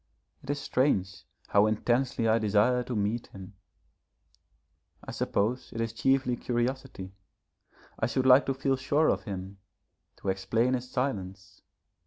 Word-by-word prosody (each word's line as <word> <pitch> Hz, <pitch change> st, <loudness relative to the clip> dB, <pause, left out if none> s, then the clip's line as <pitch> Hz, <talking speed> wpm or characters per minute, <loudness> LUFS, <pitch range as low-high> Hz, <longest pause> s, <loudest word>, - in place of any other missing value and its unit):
It 135 Hz, -, -14 dB
is 145 Hz, 0 st, -1 dB
strange 125 Hz, -9 st, 0 dB, 0.2 s
how 105 Hz, +1 st, +4 dB
intensely 120 Hz, +2 st, 0 dB
I 110 Hz, +1 st, +3 dB
desire 110 Hz, +4 st, +2 dB
to 125 Hz, -, -4 dB
meet 105 Hz, +3 st, -1 dB
him. 95 Hz, +1 st, -11 dB, 1.5 s
I -, -, -7 dB
suppose 115 Hz, +6 st, -1 dB
it 115 Hz, -, -5 dB
is 115 Hz, -1 st, -2 dB
chiefly 130 Hz, +2 st, +1 dB
curiosity. 120 Hz, -6 st, -3 dB, 0.9 s
I -, -, +1 dB
should 130 Hz, +2 st, -1 dB
like 130 Hz, +2 st, +6 dB
to 135 Hz, -, 0 dB
feel 135 Hz, 0 st, 0 dB
sure 145 Hz, +4 st, +2 dB
of -, -, -1 dB
him, 95 Hz, -1 st, -6 dB, 0.6 s
to 100 Hz, -, -4 dB
explain 110 Hz, +6 st, +1 dB
his 125 Hz, 0 st, -3 dB
silence. 95 Hz, -8 st, -4 dB
120 Hz, 140 wpm, -28 LUFS, 100-130 Hz, 1.5 s, like